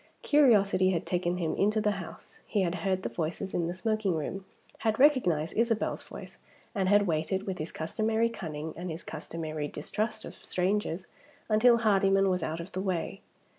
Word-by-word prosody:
Curiosity 205 -10 +4
had 180 -2 -1
taken 180 0 0
him 165 -3 -1
into 210 +2 +2
the 210 -1 +2
house. 170 - -11
He 205 -3 +1
had 175 -1 0
heard 185 +1 -1
the - - 0
voices 175 +3 -3
in 170 -1 0
the 175 - -3
smoking 215 -2 0
room; 185 +5 -4 0.3
had 220 -1 +1
recognized 210 - +3
Isabel's 230 -1 +1
voice; - - -11 0.3
and 190 -3 0
had 205 0 +5
waited, 175 +3 -1
with 190 -2 -4
his 155 +2 -4
customary 220 +8 0
cunning 160 -8 -5
and 175 +2 -5
his 165 +2 -6
customary 155 -1 -5
distrust 215 +9 -3
of - - -8
strangers, 185 -1 -1 0.4
until 235 +3 +5
Hardyman 195 -3 +3
was 180 -1 0
out 160 +1 -3
of 170 +3 -7
the 185 - -3
way. 190 +1 -2
190 Hz, 175 wpm, -29 LUFS, 170-215 Hz, 0.4 s, had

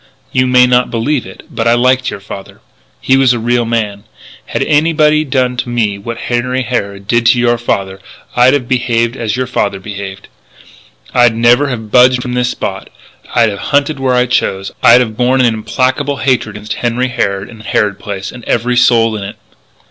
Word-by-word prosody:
You 130 0 +1
may 125 0 +5
not 125 0 +2
believe 120 +1 -1
it, 95 - -12
but 115 - -2
I 115 - +4
liked 130 +1 +2
your - - -7
father. 100 0 -10 0.4
He 130 - +2
was 135 -2 +4
a 120 - -2
real 120 +1 0
man. 105 -3 -2 0.4
Had - - -2
anybody 155 0 +2
done 130 -3 -1
to 120 - -3
me 110 -4 -1
what 115 +3 -6
Henry 125 +2 -2
Harrod 100 -5 -4
did 115 0 +2
to 120 +1 +4
your 120 -1 +2
father 95 -4 -2 0.4
I'd 125 +3 +5
have 130 -4 -2
behaved 120 -2 0
as 115 -3 -3
your 130 - -1
father 100 -5 -2
behaved; 100 -1 -8 0.9
I'd 120 -2 +4
never 120 +5 +3
have 110 -5 -5
budged 125 0 +4
from 125 - -4
this 125 0 0
spot; - - -5 0.5
I'd 115 -2 +3
have 100 - -7 0.2
hunted 145 0 +1
where 130 -1 +1
I 125 0 +3
chose; 95 -5 -1
I'd 120 +2 +7
have 110 -3 -3
borne 125 +2 +2
an 120 -2 +3
implacable 130 +5 -1
hatred 130 -4 0
against 105 0 -5
Henry 125 +2 0
Harrod 100 -5 -2
and 115 -2 -13
Harrod 105 -2 -1
Place, 95 -2 -6
and 120 - -11
every 120 +1 0
soul 115 -2 +3
in 105 - -5
it!" 100 +3 -7
120 Hz, 195 wpm, -13 LUFS, 110-125 Hz, 0.9 s, I'd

